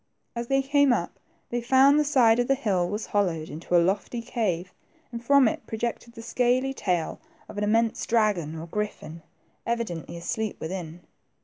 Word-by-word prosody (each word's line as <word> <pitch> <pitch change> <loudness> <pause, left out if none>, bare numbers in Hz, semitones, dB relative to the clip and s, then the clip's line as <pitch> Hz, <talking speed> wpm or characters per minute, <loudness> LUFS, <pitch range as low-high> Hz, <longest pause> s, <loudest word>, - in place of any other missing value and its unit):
As 235 0 -4
they 270 +1 +2
came 285 0 +3
up, - - -1 0.3
they 240 0 -1
found 265 +4 +5
the - - +3
side 245 -6 +4
of 245 - +1
the 275 - +3
hill 190 -9 0
was 210 +3 -3
hollowed 175 -6 -1
into 165 +3 -3
a 170 - +4
lofty 200 +5 -1
cave, 190 -7 -2 0.4
and 235 -1 -6
from 280 0 +5
it - - -3
projected 235 +1 -4
the 230 - -9
scaly 255 +3 +1
tail 180 -9 -2 0.3
of 205 - -7
an - - -1
immense 225 +2 +1
dragon 205 -9 +1
or 160 - -6
griffin, 170 -3 -5 0.4
evidently 180 -8 -3
asleep 215 +5 -3
within. 170 0 -6
225 Hz, 175 wpm, -26 LUFS, 180-245 Hz, 0.4 s, found